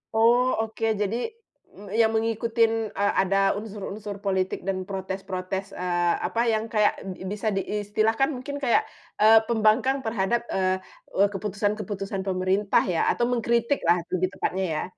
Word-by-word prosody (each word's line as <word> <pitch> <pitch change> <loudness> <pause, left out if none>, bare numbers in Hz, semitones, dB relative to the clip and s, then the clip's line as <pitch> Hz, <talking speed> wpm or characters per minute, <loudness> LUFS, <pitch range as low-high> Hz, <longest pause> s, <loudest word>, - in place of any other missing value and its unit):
Oh 235 +3 +5 0.2
oke, 225 0 -3 0.2
jadi 205 +3 0 0.6
m 200 0 -12
yang 225 -1 +5
mengikutin, 225 0 +1
eee, 200 0 +1
ada 195 +1 +1 0.2
unsur-unsur 210 -1 -6
politik 190 -2 -1
dan 185 0 -3
protes-protes, 190 0 -4
eee, 175 -1 0
apa, 230 - -1
yang 220 +1 -1
kayak 210 -2 +3
b 190 -1 -7
bisa 210 +1 -1
diistilahkan, 215 +6 0
mungkin 285 +1 -5
kayak, 245 -4 +3 0.3
eee, 220 +1 +7
pembangkang 230 +4 +3
terhadap, 225 +2 0
eee 185 0 +1 0.4
eee, 200 - +5
keputusan-keputusan 205 0 -2
pemerintah 190 +2 +2
ya, 175 -3 0
atau 240 - +1
mengkritiklah 235 -5 +1 0.2
lebih 185 0 +1
tepatnya 190 +1 -1
ya? - - -1
210 Hz, 135 wpm, -25 LUFS, 190-225 Hz, 0.6 s, eee